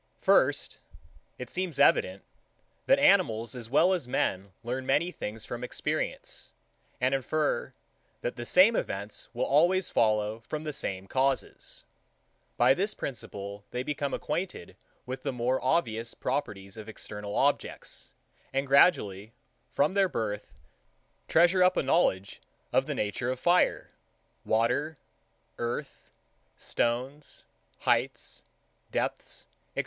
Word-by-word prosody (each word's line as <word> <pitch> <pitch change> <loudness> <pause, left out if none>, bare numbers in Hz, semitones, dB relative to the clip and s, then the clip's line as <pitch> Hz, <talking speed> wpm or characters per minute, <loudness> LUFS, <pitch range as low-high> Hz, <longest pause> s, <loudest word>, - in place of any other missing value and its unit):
83. - - -28
First, - - +3 0.6
It 125 -1 -7
seems 180 -5 -2
evident, 100 -8 +3 0.6
that - - +6
animals 115 +1 +3
as 120 -3 -7
well 170 +8 +4
as 175 -9 -2
men 95 -5 -1
learn 125 +3 -3
many 150 +7 +1
things 110 -7 -6
from 120 0 -6
experience, 125 - -4 0.5
and 125 +1 +2
infer, 145 +3 -1 0.5
that 120 - -3
the 120 - -6
same 185 - +5
events 100 - -4
will - - 0
always 175 +6 +3
follow 110 0 +1
from 150 +7 -6
the 150 -1 -4
same 95 -7 -3
causes. 135 +5 -2 0.7
By 125 +2 +6
this 200 +8 -1
principle 100 -5 -6
they 125 +1 -3
become 140 0 -2
acquainted 175 - -4 0.3
with 130 +1 -5
the - - -2
more 125 +1 -1
obvious 115 -5 0
properties 100 -7 -3
of 110 0 -8
external 105 -1 -7
objects, 140 +1 -1 0.4
and 135 +1 0
gradually, 115 - +3 0.4
from 150 +6 +1
their 195 -2 +3
birth, 105 - -3 0.8
treasure 175 +3 +4
up 180 0 +4
a - - +2
knowledge 100 - +1 0.3
of - - +3
the - - -2
nature 105 +4 -2
of 130 0 -2
fire, 175 +4 +2 0.5
water, 135 +7 +1 0.6
earth, 120 +4 -4 0.5
stones, 130 +5 -2 0.4
heights, - - 0 0.5
depths, - - -3 0.3
&c. - - -2
125 Hz, 125 wpm, -29 LUFS, 110-150 Hz, 0.8 s, that